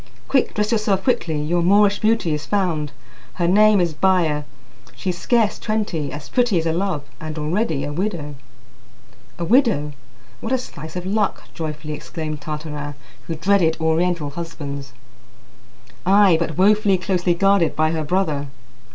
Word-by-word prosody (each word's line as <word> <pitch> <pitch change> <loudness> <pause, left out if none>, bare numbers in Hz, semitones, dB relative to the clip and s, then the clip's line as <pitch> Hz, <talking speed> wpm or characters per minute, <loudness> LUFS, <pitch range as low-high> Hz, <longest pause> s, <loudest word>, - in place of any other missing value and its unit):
"Quick! 265 -2 +1
Dress 210 0 0
yourself 210 -4 +1
quickly! 165 - 0
Your 170 +4 0
Moorish 200 +3 +4
beauty 220 -7 +2
is 150 0 -4
found, 170 -8 0 0.4
Her 175 -2 0
name 210 +2 +5
is 170 -3 +1
Baya. 160 -4 +2 0.5
She's 185 -2 -3
scarce 225 +4 +1
twenty 205 -9 -2
as 145 0 -7
pretty 240 -6 +2
as 165 - 0
a 165 - +1
love, 175 -4 -1 0.2
and 155 0 -6
already 155 -1 -1
a 145 +1 -4
widow." 170 -4 -3 1.0
"A 170 - -3
widow! 205 - +3 0.5
What 225 - -5
a - - +4
slice 160 - -9
of 180 0 -4
luck!" 205 +1 0
joyfully 155 -1 -5
exclaimed 155 0 -5
Tartarin, 150 -1 -5 0.3
who 165 - -3
dreaded 165 -1 +2
Oriental 160 -1 +1
husbands. 140 -5 -6 1.1
"Ay, 195 -1 +5
but 165 -2 -2
woefully 205 0 +4
closely 180 -1 0
guarded 195 -2 +3
by 155 0 +2
her 160 -1 -1
brother." 150 -4 0
170 Hz, 150 wpm, -21 LUFS, 155-200 Hz, 1.1 s, name